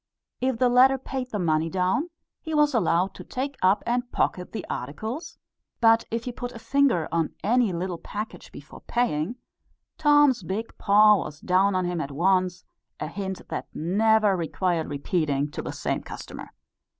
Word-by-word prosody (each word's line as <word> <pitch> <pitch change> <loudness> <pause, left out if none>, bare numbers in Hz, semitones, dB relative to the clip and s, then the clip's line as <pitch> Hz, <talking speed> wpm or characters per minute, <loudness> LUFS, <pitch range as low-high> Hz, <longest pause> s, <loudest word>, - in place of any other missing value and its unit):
If 255 -1 0
the 250 - +3
latter 255 +2 +5
paid 260 -1 -5
the 215 - -3
money 160 -3 +1
down, 185 - 0 0.3
he 320 -2 -4
was 295 -1 +3
allowed 185 -4 +2
to - - -10
take 275 +2 -4
up 190 +2 +3
and 245 +1 -1
pocket 180 0 -1
the 225 - -5
articles; 220 - -5 0.4
but 225 -1 +5
if 230 +1 -2
he 250 - -4
put 245 0 -6
a - - -8
finger 235 - +2
on 165 -2 -1
any 235 0 +3
little 175 0 -3
package 210 +2 -7
before - - -12
paying, 230 -4 -1 0.6
Tom's 290 -5 +5
big 195 +6 -4
paw 210 +1 +6
was 150 -4 -6
down 185 +3 +2
on 185 -1 +1
him 175 -2 -2
at 140 - -4
once, 180 +4 +1 0.3
a - - -3
hint 190 +3 -5
that - - -4
never 210 +4 +3
required 170 0 -1
repeating 145 -1 -1
to - - -5
the - - -5
same - - -2
customer. - - -9
200 Hz, 170 wpm, -25 LUFS, 175-245 Hz, 0.6 s, paw